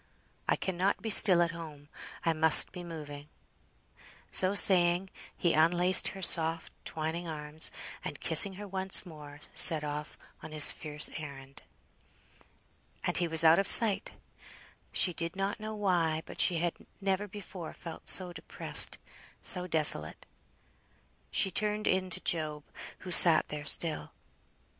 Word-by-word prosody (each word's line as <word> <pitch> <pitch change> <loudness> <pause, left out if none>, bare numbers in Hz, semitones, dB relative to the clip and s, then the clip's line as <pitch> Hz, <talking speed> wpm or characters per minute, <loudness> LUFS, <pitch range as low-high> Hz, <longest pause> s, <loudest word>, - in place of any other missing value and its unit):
I - - +1
cannot 190 +1 -4
be 220 - -3
still 185 -4 +7
at 170 - -5
home. 155 -4 -13 0.4
I 165 - -1
must 160 0 +3
be 180 -1 -11
moving." 150 -3 -12 1.0
So 190 +2 +4
saying, 180 -1 +3 0.3
he 170 - -2
unlaced 175 +4 +2
her 195 - -9
soft 165 -1 +1
twining 160 +2 -7
arms, 150 0 +1 0.3
and - - -9
kissing 200 -2 +3
her 205 +2 -12
once 190 +1 0
more, 150 -3 -15
set 160 -3 +4
off 150 +1 -9 0.2
on 155 - -13
his 150 -2 +4
fierce 150 -1 -3
errand. 140 -3 -13 1.4
And - - -3
he 175 - -2
was 160 0 +6
out 160 +2 +3
of 195 - -3
sight! 215 -4 +6 0.8
She 180 - -2
did 165 +1 -4
not 195 +2 -6
know 215 0 -9
why, 170 -6 -3
but - - -8
she 175 - -1
had 170 +1 -4 0.3
never 195 +1 -4
before 190 -4 -12
felt 165 -2 -13
so 180 -2 +2
depressed, 160 - -2 0.4
so 180 0 +4
desolate. 160 -3 +1 1.0
She 190 - -3
turned 210 +3 -3
in 185 0 -3
to 185 - -3
Job, 155 -3 -5 0.4
who 185 - -11
sat 170 -2 +4
there 150 0 -9
still. 160 +1 +2
170 Hz, 145 wpm, -27 LUFS, 155-190 Hz, 1.4 s, still